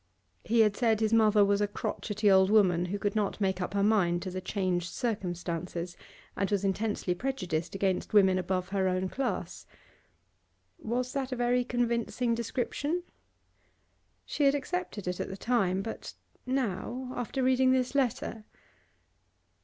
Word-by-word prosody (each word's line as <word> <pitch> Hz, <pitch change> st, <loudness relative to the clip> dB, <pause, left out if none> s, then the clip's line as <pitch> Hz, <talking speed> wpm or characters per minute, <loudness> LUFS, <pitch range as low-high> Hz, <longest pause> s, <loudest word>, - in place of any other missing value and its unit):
He 230 Hz, +1 st, +3 dB
had 210 Hz, -2 st, +3 dB
said 225 Hz, -3 st, +2 dB
his 220 Hz, 0 st, +1 dB
mother 215 Hz, -2 st, +5 dB
was 200 Hz, 0 st, +2 dB
a 205 Hz, -, +2 dB
crotchety 210 Hz, 0 st, -1 dB
old 190 Hz, 0 st, +5 dB
woman 185 Hz, -5 st, +4 dB
who 190 Hz, +3 st, -3 dB
could 205 Hz, +1 st, -2 dB
not 210 Hz, -1 st, -1 dB
make 190 Hz, -2 st, 0 dB
up 185 Hz, +2 st, -3 dB
her 200 Hz, -, +2 dB
mind 180 Hz, -5 st, +2 dB
to 185 Hz, -, -4 dB
the 185 Hz, +1 st, -4 dB
changed 185 Hz, -3 st, -1 dB
circumstances, 175 Hz, -5 st, -3 dB, 0.4 s
and 195 Hz, -, -1 dB
was 200 Hz, -1 st, 0 dB
intensely 195 Hz, -1 st, 0 dB
prejudiced 180 Hz, -8 st, -3 dB
against 190 Hz, -1 st, 0 dB
women 190 Hz, -3 st, +5 dB
above 185 Hz, 0 st, -2 dB
her 190 Hz, -1 st, +1 dB
own 185 Hz, 0 st, 0 dB
class. 270 Hz, +6 st, -3 dB, 1.1 s
Was 250 Hz, -3 st, -2 dB
that 270 Hz, -1 st, -2 dB
a -, -, -1 dB
very 245 Hz, 0 st, +2 dB
convincing 235 Hz, -1 st, 0 dB
description? 260 Hz, +8 st, -2 dB, 1.2 s
She 290 Hz, -, 0 dB
had 275 Hz, +1 st, +5 dB
accepted 285 Hz, -, -4 dB
it 180 Hz, 0 st, -2 dB
at -, -, -3 dB
the 190 Hz, -, -6 dB
time, 195 Hz, -5 st, +1 dB
but 225 Hz, -, -7 dB, 0.3 s
now, 250 Hz, 0 st, -2 dB
after 250 Hz, +2 st, -2 dB
reading 260 Hz, 0 st, +4 dB
this 255 Hz, 0 st, +1 dB
letter 240 Hz, -5 st, -1 dB
210 Hz, 155 wpm, -29 LUFS, 185-245 Hz, 1.2 s, mother